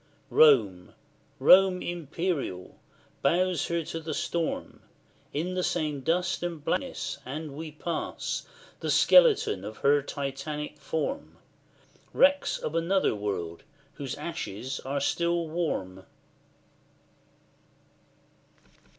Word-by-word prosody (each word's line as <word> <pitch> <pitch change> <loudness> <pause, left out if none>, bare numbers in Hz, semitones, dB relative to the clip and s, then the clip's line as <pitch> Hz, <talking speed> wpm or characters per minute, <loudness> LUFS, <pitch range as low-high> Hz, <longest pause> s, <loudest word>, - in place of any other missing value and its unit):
Rome 105 -12 +4 0.4
Rome 185 -1 +6
imperial, 165 - -3 0.4
bows 175 +2 +2
her 170 -1 -1
to 165 - -5
the 155 -2 -4
storm, 170 -1 -3 0.5
In 170 +5 -2
the 185 - -1
same 155 -5 -1
dust 175 +5 0
and 170 -4 -4
blackness, 270 - -2
and 145 +2 -6
we 155 +1 -6
pass 165 +2 -4 0.3
The - - -3
skeleton 470 - +5
of 110 +2 -7
her 145 +1 +5
Titanic 145 +2 -5
form, 160 - -3 0.8
Wrecks 285 +1 +3
of 155 - -4
another 170 +4 +2
world, 100 -5 -4 0.3
whose 140 -3 -5
ashes 135 - -5 0.2
still 170 +4 +1
are 160 -1 -8
warm. 95 - -2
155 Hz, 100 wpm, -28 LUFS, 135-175 Hz, 0.8 s, Rome